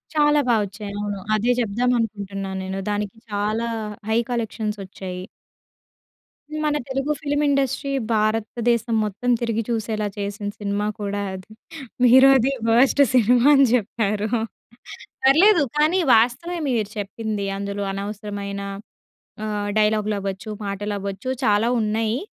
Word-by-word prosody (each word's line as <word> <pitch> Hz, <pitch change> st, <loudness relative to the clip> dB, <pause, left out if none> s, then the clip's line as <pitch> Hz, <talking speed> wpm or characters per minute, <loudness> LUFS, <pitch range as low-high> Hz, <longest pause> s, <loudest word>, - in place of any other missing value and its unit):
చాలా 295 Hz, -1 st, +4 dB
బాగా 225 Hz, -2 st, +4 dB
వచ్చాయి. 200 Hz, +1 st, -8 dB
అవును, 205 Hz, -1 st, -3 dB, 0.2 s
అదే 230 Hz, +4 st, +2 dB
చెప్దాం 240 Hz, +3 st, +1 dB
అనుకుంటున్నాను 195 Hz, -3 st, -4 dB
నేను. 190 Hz, +1 st, -4 dB
దానికి 205 Hz, +1 st, -3 dB
చాలా 210 Hz, +3 st, -1 dB, 0.4 s
హై 220 Hz, -, +2 dB
కలెక్షన్స్ 220 Hz, -3 st, -2 dB
వచ్చాయి. 185 Hz, -1 st, -7 dB, 1.4 s
మన 300 Hz, -1 st, +1 dB
తెలుగు 270 Hz, +2 st, -1 dB
ఫిల్మ్ 290 Hz, 0 st, 0 dB
ఇండస్ట్రీ 275 Hz, 0 st, 0 dB, 0.2 s
భారతదేశం 225 Hz, +2 st, 0 dB
మొత్తం 210 Hz, +5 st, -3 dB
తిరిగి 230 Hz, -1 st, 0 dB
చూసేలా 220 Hz, -2 st, -1 dB
చేసిన 205 Hz, +1 st, -4 dB
సినిమా 205 Hz, 0 st, -1 dB
కూడా 205 Hz, 0 st, -2 dB
అది. 185 Hz, +3 st, -10 dB, 0.5 s
మీరు 260 Hz, +3 st, +8 dB
అది 260 Hz, +2 st, +1 dB, 0.2 s
వర్స్ట్ 255 Hz, +5 st, +4 dB
సినిమా 245 Hz, +1 st, +4 dB
అని 275 Hz, -, +6 dB
చెప్పారు, 215 Hz, -2 st, 0 dB, 1.0 s
పర్లేదు, 320 Hz, +5 st, +6 dB
కానీ 315 Hz, +5 st, +3 dB, 0.2 s
వాస్తవమే 255 Hz, +10 st, +1 dB
మీరు 220 Hz, -4 st, 0 dB
చెప్పింది. 205 Hz, 0 st, -3 dB
అందులో 200 Hz, 0 st, -3 dB
అనవసరమైన 200 Hz, 0 st, -5 dB, 0.8 s
ఆహ్, 210 Hz, -1 st, -2 dB
డైలాగ్‌లు 215 Hz, 0 st, +2 dB
అవ్వచ్చు, 195 Hz, +1 st, -5 dB, 0.2 s
మాటలు 205 Hz, +1 st, -3 dB
అవ్వచ్చు 200 Hz, +5 st, -5 dB
చాలా 210 Hz, 0 st, +3 dB
ఉన్నాయి. 220 Hz, +3 st, 0 dB
215 Hz, 120 wpm, -22 LUFS, 205-245 Hz, 1.4 s, మీరు